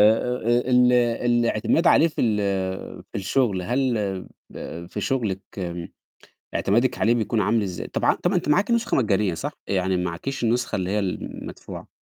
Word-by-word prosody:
آآ 125 Hz, +2 st, -2 dB, 0.2 s
ال 125 Hz, 0 st, +4 dB
الاعتماد 120 Hz, +4 st, +2 dB
عليه 165 Hz, -, +6 dB
في 155 Hz, -, -4 dB
ال 110 Hz, -3 st, +2 dB, 0.7 s
في -, -, -12 dB
الشُغل، 100 Hz, 0 st, +1 dB
هل 125 Hz, +7 st, 0 dB, 0.6 s
ب 85 Hz, +1 st, -7 dB
في -, -, -5 dB
شُغلِك 110 Hz, -8 st, -1 dB, 1.1 s
اعتمادِك 120 Hz, +5 st, +1 dB
عليه 115 Hz, +2 st, +3 dB
بيكون 115 Hz, -1 st, 0 dB
عامل 110 Hz, +2 st, +2 dB
إزاي؟ 90 Hz, -3 st, -4 dB
طبع -, -, +1 dB
طَب 175 Hz, -, -1 dB
ما 190 Hz, -, +1 dB
أنتِ 175 Hz, -, -1 dB
معاكِ 200 Hz, +9 st, +3 dB
نسخة 235 Hz, 0 st, +1 dB
مجانية 105 Hz, -6 st, +1 dB
صح؟ -, -, -4 dB
يعني 95 Hz, -1 st, 0 dB
معاكيش 90 Hz, +10 st, -3 dB
النسخة 120 Hz, +2 st, +1 dB
اللي 95 Hz, -1 st, -2 dB
هي 105 Hz, -, +1 dB
المدفوعة. 95 Hz, -3 st, -6 dB
115 Hz, 155 wpm, -24 LUFS, 95-125 Hz, 1.1 s, عليه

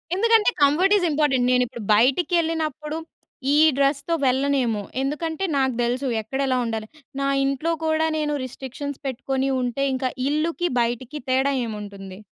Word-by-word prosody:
ఎందుకంటే, 450 Hz, +1 st, +4 dB
comfort 350 Hz, +9 st, +4 dB
is 365 Hz, -, 0 dB
important 280 Hz, -4 st, +2 dB
నేనిప్పుడు 250 Hz, -1 st, 0 dB
బైటికెళ్ళినప్పుడు 315 Hz, -, +1 dB, 0.6 s
ఈ -, -, +4 dB, 0.2 s
డ్రస్‌తో 280 Hz, +3 st, +1 dB
వెళ్ళనేమో! 260 Hz, -4 st, +1 dB, 0.2 s
ఎందుకంటే, 320 Hz, +6 st, -2 dB
నాకు 265 Hz, -1 st, +1 dB
దెలుసు 250 Hz, +3 st, -1 dB
ఎక్కడెలా 265 Hz, +3 st, -1 dB
ఉండాలి. 220 Hz, -1 st, -3 dB, 0.3 s
నా 275 Hz, -, +1 dB, 0.2 s
ఇంట్లో 275 Hz, +5 st, -1 dB
కూడా, 315 Hz, 0 st, +2 dB
నేను 300 Hz, -1 st, -1 dB
రిస్ట్రిక్షన్స్ 265 Hz, +2 st, -6 dB
పెట్టుకొని 265 Hz, +1 st, -2 dB
ఉంటే, 250 Hz, +3 st, -1 dB
ఇంక 260 Hz, -1 st, -1 dB, 0.2 s
ఇళ్ళుకి, 330 Hz, +4 st, 0 dB
బైటికి 240 Hz, +5 st, -3 dB
తేడా 265 Hz, +2 st, +2 dB
ఏముంటుంది? 200 Hz, -3 st, -8 dB
275 Hz, 125 wpm, -23 LUFS, 250-310 Hz, 0.6 s, ఎందుకంటే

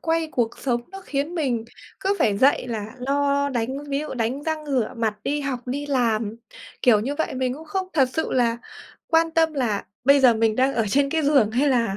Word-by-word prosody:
quay 325 Hz, -1 st, 0 dB
cuộc 235 Hz, -2 st, -1 dB
sống 240 Hz, -3 st, 0 dB
nó 390 Hz, -, -8 dB
khiến 290 Hz, +5 st, -2 dB
mình 250 Hz, -8 st, -1 dB, 0.4 s
cứ 390 Hz, +1 st, +1 dB
phải 205 Hz, -2 st, +2 dB
dậy 270 Hz, -1 st, +3 dB
là 220 Hz, 0 st, -5 dB
lo 280 Hz, +2 st, +1 dB
đánh 240 Hz, -3 st, -1 dB, 0.2 s
ví 275 Hz, 0 st, -1 dB
dụ 305 Hz, -, -5 dB
đánh 245 Hz, +4 st, -2 dB
răng 315 Hz, -1 st, -3 dB
rửa 260 Hz, -6 st, 0 dB
mặt, 220 Hz, -2 st, 0 dB
đi 295 Hz, +1 st, -1 dB
học 270 Hz, -3 st, -3 dB
đi 285 Hz, +3 st, -3 dB
làm, 230 Hz, -5 st, 0 dB, 0.5 s
kiểu 225 Hz, -4 st, +5 dB
như 265 Hz, +7 st, -2 dB
vậy. 315 Hz, -2 st, -2 dB
Mình 255 Hz, 0 st, -1 dB
cũng 315 Hz, -, -10 dB
không 370 Hz, +4 st, -3 dB
thật 270 Hz, -5 st, +3 dB
sự 320 Hz, -, -2 dB
là 235 Hz, -2 st, +2 dB, 0.5 s
quan 325 Hz, 0 st, +3 dB
tâm 320 Hz, -1 st, +2 dB
là 240 Hz, -8 st, -1 dB, 0.2 s
bây 280 Hz, +1 st, +6 dB
giờ 245 Hz, -3 st, +6 dB
mình 220 Hz, -1 st, +1 dB
đang 265 Hz, +2 st, +2 dB
ở 225 Hz, -2 st, +1 dB
trên 275 Hz, +5 st, +2 dB
cái 320 Hz, -1 st, 0 dB
giường 280 Hz, -7 st, +3 dB
hay 265 Hz, +6 st, +2 dB
là 230 Hz, -6 st, +1 dB
270 Hz, 220 wpm, -23 LUFS, 235-295 Hz, 0.5 s, bây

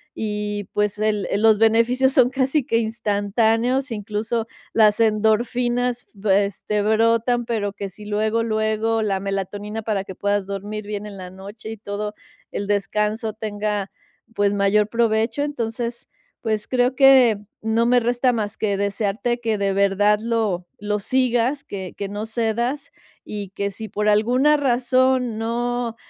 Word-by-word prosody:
y, 210 Hz, -1 st, -3 dB
pues, 210 Hz, 0 st, 0 dB
el 210 Hz, -3 st, 0 dB
el 200 Hz, -, 0 dB
los 220 Hz, -1 st, +5 dB
beneficios 235 Hz, +4 st, +3 dB
son 250 Hz, -2 st, +5 dB
casi 270 Hz, +2 st, +1 dB
que 230 Hz, -, +1 dB
instantáneos, 225 Hz, +3 st, 0 dB
incluso, 220 Hz, +2 st, -2 dB, 0.3 s
las 215 Hz, -1 st, +4 dB
endorfinas, 240 Hz, +3 st, +1 dB
v 200 Hz, -1 st, +2 dB
este, 205 Hz, +2 st, -2 dB
brotan, 230 Hz, +2 st, +2 dB
pero 205 Hz, -4 st, -2 dB
que 200 Hz, -1 st, -5 dB
si 210 Hz, +3 st, -12 dB
luego, 215 Hz, +2 st, 0 dB
luego, 220 Hz, 0 st, 0 dB
la 200 Hz, -3 st, 0 dB
melatonina 200 Hz, +2 st, -4 dB
para 210 Hz, -3 st, -1 dB
que 190 Hz, -, -8 dB
puedas 205 Hz, 0 st, 0 dB
dormir 205 Hz, +2 st, -5 dB
bien 210 Hz, 0 st, -4 dB
en 200 Hz, -1 st, -9 dB
la 185 Hz, -1 st, -8 dB
noche 205 Hz, +4 st, -9 dB
y 225 Hz, -, -7 dB
todo 210 Hz, +1 st, -5 dB, 0.4 s
el 200 Hz, -, -4 dB
descanso 210 Hz, +2 st, 0 dB
tenga, 210 Hz, -2 st, -3 dB, 0.4 s
pues, 205 Hz, 0 st, +2 dB
mayor 205 Hz, +1 st, +3 dB
provecho. 230 Hz, +3 st, +1 dB
Entonces, 235 Hz, -4 st, -4 dB, 0.3 s
pues, 215 Hz, -2 st, -2 dB
creo 250 Hz, 0 st, +2 dB
que 260 Hz, -5 st, +6 dB, 0.2 s
no 225 Hz, +1 st, +1 dB
me 245 Hz, +1 st, +4 dB
resta 245 Hz, +2 st, +2 dB
más 215 Hz, -1 st, -3 dB
que 205 Hz, -2 st, 0 dB
desearte 210 Hz, +4 st, -1 dB
que, 225 Hz, -2 st, 0 dB
de 200 Hz, -1 st, 0 dB
verdad, 200 Hz, +1 st, +3 dB
lo 220 Hz, -6 st, -1 dB
lo 210 Hz, +1 st, -1 dB
sigas, 255 Hz, +4 st, +1 dB
que 190 Hz, -2 st, -6 dB
que 200 Hz, -, -3 dB
no 205 Hz, +1 st, -4 dB
cedas, 235 Hz, +5 st, -2 dB, 0.3 s
y 205 Hz, -3 st, -6 dB
que 200 Hz, 0 st, -1 dB
si 220 Hz, +2 st, -7 dB
por 210 Hz, 0 st, -1 dB
alguna 250 Hz, +8 st, +4 dB
razón, 255 Hz, -2 st, +2 dB
no 235 Hz, +1 st, -2 dB
220 Hz, 150 wpm, -22 LUFS, 205-235 Hz, 0.4 s, que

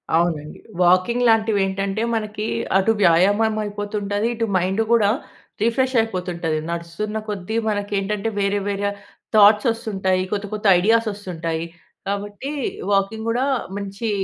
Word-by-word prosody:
అవునండి. 160 Hz, -3 st, -1 dB, 0.2 s
వాకింగ్ 185 Hz, +8 st, +3 dB
లాంటివి 220 Hz, -2 st, +3 dB
ఏంటంటే 195 Hz, +2 st, -2 dB
మనకి 215 Hz, -1 st, -3 dB, 0.3 s
అటు 195 Hz, +3 st, +3 dB
వ్యాయామం 205 Hz, +6 st, +4 dB
అయిపోతుంటాది, 205 Hz, 0 st, -2 dB
ఇటు 230 Hz, 0 st, -1 dB
మైండ్ 190 Hz, +4 st, 0 dB
గూడా 215 Hz, -4 st, +4 dB, 0.5 s
రిఫ్రెష్ 255 Hz, +3 st, +1 dB
అయిపోతుంటాది. 180 Hz, -6 st, -2 dB
నడుస్తున్న 170 Hz, +6 st, -4 dB
కొద్దీ 205 Hz, +1 st, -4 dB
మనకేంటంటే 205 Hz, 0 st, -1 dB
వేరే, 200 Hz, 0 st, +1 dB
వేరే 200 Hz, 0 st, -1 dB, 0.5 s
థాట్స్ 210 Hz, +2 st, +6 dB
వస్తుంటాయి. 190 Hz, -5 st, -1 dB
కొత్త, 205 Hz, 0 st, -2 dB
కొత్త 215 Hz, 0 st, -5 dB
ఐడియాస్ 225 Hz, +4 st, +3 dB
వస్తుంటాయి. 170 Hz, -5 st, -4 dB, 0.4 s
కాబట్టి 205 Hz, +6 st, -4 dB, 0.4 s
వాకింగ్ 200 Hz, +3 st, 0 dB
గూడా 245 Hz, +3 st, +1 dB, 0.3 s
మంచి 200 Hz, +3 st, -4 dB
205 Hz, 120 wpm, -21 LUFS, 190-220 Hz, 0.5 s, థాట్స్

